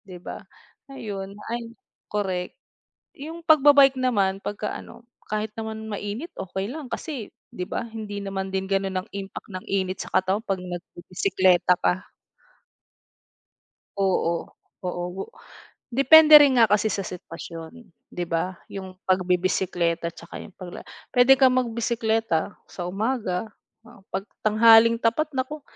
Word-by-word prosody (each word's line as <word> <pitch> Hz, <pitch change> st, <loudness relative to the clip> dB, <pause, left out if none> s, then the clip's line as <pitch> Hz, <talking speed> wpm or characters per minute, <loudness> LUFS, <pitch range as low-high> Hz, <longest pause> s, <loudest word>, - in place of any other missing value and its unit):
di 190 Hz, -4 st, -12 dB
ba, 175 Hz, -, -8 dB, 0.5 s
ayon. 200 Hz, -7 st, -6 dB, 0.2 s
Ay, 235 Hz, -1 st, -5 dB, 0.3 s
korek. 190 Hz, -2 st, -2 dB, 0.6 s
Yung 325 Hz, +4 st, -9 dB
pagba-bike 280 Hz, -3 st, +6 dB
naman, 195 Hz, -6 st, +1 dB
pagka 210 Hz, +1 st, -4 dB
ano, 235 Hz, -, -11 dB, 0.2 s
kahit 215 Hz, 0 st, -2 dB
naman 220 Hz, -1 st, -6 dB
mainit, 210 Hz, -, -5 dB
okey 190 Hz, +3 st, -4 dB
lang, 290 Hz, -3 st, -7 dB
kasi, 270 Hz, -10 st, -5 dB, 0.2 s
di 180 Hz, -, -6 dB
ba, -, -, -3 dB
hindi 215 Hz, -3 st, -6 dB
naman 195 Hz, -1 st, -4 dB
din 190 Hz, 0 st, -2 dB
gano'n 195 Hz, -1 st, 0 dB
ang -, -, -26 dB
impact 195 Hz, -1 st, -7 dB
ng 185 Hz, 0 st, -6 dB
init 190 Hz, -1 st, -1 dB
sa -, -, -9 dB
katawan 190 Hz, +3 st, +1 dB
'pag 195 Hz, -4 st, -2 dB
nagbibisekleta 180 Hz, 0 st, +1 dB
ka. 185 Hz, +1 st, -1 dB, 1.9 s
Oo, 180 Hz, -3 st, 0 dB, 0.4 s
oo. 180 Hz, +2 st, -4 dB, 0.7 s
Depende 310 Hz, +4 st, +7 dB
rin 270 Hz, -3 st, +4 dB
nga 230 Hz, -, +7 dB
kasi 210 Hz, +1 st, +3 dB
sa 200 Hz, -, -1 dB
sitwasyon, 165 Hz, +3 st, -9 dB, 0.3 s
'di 175 Hz, -, -3 dB
ba, 170 Hz, +2 st, -1 dB, 0.2 s
yung 190 Hz, -1 st, -7 dB, 0.2 s
pagbibisekleta 180 Hz, -2 st, +1 dB
tsaka 170 Hz, -, -10 dB
yung 205 Hz, -, -12 dB
pagla 180 Hz, -2 st, -9 dB, 0.3 s
puwede 250 Hz, +1 st, +7 dB
kang 260 Hz, -1 st, +5 dB
magbisikleta 225 Hz, -6 st, 0 dB, 0.2 s
sa 175 Hz, -, -6 dB
umaga, 215 Hz, -1 st, -2 dB, 0.4 s
oo, 230 Hz, -4 st, -16 dB
'pag 195 Hz, -, -2 dB, 0.2 s
tanghaling 225 Hz, +1 st, +7 dB
tapat 275 Hz, +7 st, +1 dB
naku. 265 Hz, +3 st, -3 dB
205 Hz, 130 wpm, -24 LUFS, 185-235 Hz, 1.9 s, Depende